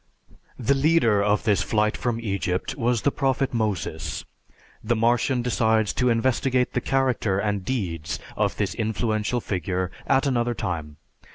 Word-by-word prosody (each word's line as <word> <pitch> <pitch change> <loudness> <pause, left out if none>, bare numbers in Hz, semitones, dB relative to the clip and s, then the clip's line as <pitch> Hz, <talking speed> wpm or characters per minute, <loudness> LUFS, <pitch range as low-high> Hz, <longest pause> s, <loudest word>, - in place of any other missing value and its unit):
The 130 +2 +2
leader 135 -7 +3
of 105 0 +2
this 105 -3 +2
flight 105 -1 +1
from 120 -2 -2
Egypt 100 -2 -2
was 120 -3 0
the 140 - +3
prophet 135 -1 0
Moses. 110 -5 -2 0.6
The 115 +2 +1
Martian 120 +2 +2
decides 110 -3 +2
to 125 -1 +1
investigate 125 +2 +1
the - - 0
character 130 -7 +1
and 100 -1 -1
deeds 85 - -3 0.2
of - - 0
this 95 -3 -1
influential 110 +1 -1
figure 90 -1 -2 0.2
at 135 +1 +3
another 120 -3 +1
time. 80 -7 -4
115 Hz, 145 wpm, -24 LUFS, 100-125 Hz, 0.6 s, leader